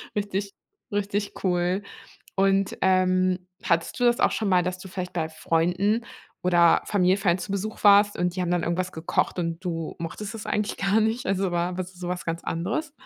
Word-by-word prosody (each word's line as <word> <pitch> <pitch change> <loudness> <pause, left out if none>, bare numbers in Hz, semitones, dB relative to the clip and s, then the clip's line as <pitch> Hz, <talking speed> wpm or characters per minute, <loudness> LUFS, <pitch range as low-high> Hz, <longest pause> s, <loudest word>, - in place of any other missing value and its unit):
Richtig 200 -1 -2 0.4
richtig 205 0 -1
cool. 180 +1 +1 0.5
Und, 195 0 +2
ähm, 185 -1 +3 0.2
hattest 170 +7 0
du - - +1
das 240 0 +3
auch - - +4
schon 215 -3 -1
mal, 180 -1 +4
dass 185 0 -2
du 190 - -9
vielleicht 180 -1 -5
bei 160 -2 -1
Freunden 180 +8 0 0.4
oder 175 -2 +5
Familienfeiern 190 -2 +2
zu 195 - -5
Besuch 200 +2 -4
warst 205 0 +6
und 180 0 0
die 185 - -1
haben 175 - -1
dann 175 -1 +1
irgendwas 180 +2 -1
gekocht 160 +2 -1
und 165 +1 -3
du 165 -2 -3
mochtest 200 +6 -5
es 220 - -7
eigentlich 210 0 -1
gar 195 +3 +2
nicht? 225 +3 0
Also 190 -1 0
war 175 +1 -1
was 185 0 -5
so 175 0 -7
was 180 0 -3
ganz 165 0 -3
anderes? 225 - -2
185 Hz, 190 wpm, -25 LUFS, 175-200 Hz, 0.5 s, warst